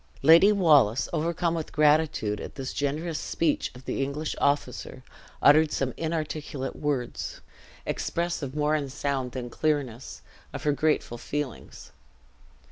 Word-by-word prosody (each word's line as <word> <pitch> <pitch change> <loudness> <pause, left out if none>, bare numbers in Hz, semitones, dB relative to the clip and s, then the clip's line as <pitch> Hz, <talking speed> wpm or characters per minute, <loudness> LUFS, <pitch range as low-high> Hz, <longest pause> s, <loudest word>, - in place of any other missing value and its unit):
Lady 165 +7 +8
Wallace, 150 - +4
overcome 170 +1 0
with 165 -2 -4
gratitude 150 -8 +2
at - - -8
this 135 -2 -5
generous 150 +3 -2
speech 160 -3 -1
of 125 - -13
the - - -2
English 140 +3 -2
officer, 140 -2 -1 0.4
uttered 155 +1 +6
some 130 -2 -1
inarticulate 155 -4 -3
words, 140 -5 -3 0.5
expressive 170 -5 -2
more 150 0 +1
in 145 -3 -1
sound 135 -2 -2
than 125 -2 -4
clearness, 135 -3 -2 0.3
of - - -6
her 150 - +3
grateful 145 -5 0
feelings. 145 -4 -6
150 Hz, 125 wpm, -27 LUFS, 135-155 Hz, 0.5 s, Lady